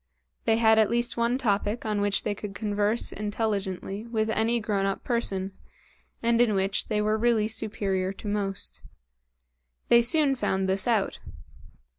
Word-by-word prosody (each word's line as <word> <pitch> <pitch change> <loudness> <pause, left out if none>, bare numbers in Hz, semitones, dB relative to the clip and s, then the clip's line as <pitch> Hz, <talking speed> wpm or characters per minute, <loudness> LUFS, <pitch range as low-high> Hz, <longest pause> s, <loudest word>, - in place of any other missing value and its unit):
They 225 0 +3
had 220 -1 +5
at 215 - +4
least 240 +1 0
one 235 +1 +1
topic 210 -1 -1
on 210 -1 0
which 205 -1 0
they 210 - -1
could 205 -1 -8
converse 210 +1 0
intelligently 205 -1 -3
with 220 -1 -1
any 225 +2 +1
grown 205 -3 -1
up 195 - -3
person, 195 -5 -1 0.7
and 235 0 +3
in 225 -4 +3
which 195 0 0
they 210 -1 0
were 215 +1 +1
really 230 -2 +2
superior 200 -4 -1
to 200 - -9
most. 200 -2 -1 1.1
They 235 - +7
soon 275 +4 +3
found 190 -7 -1
this 190 +2 0
out. 220 -5 +1
215 Hz, 155 wpm, -27 LUFS, 200-230 Hz, 1.1 s, They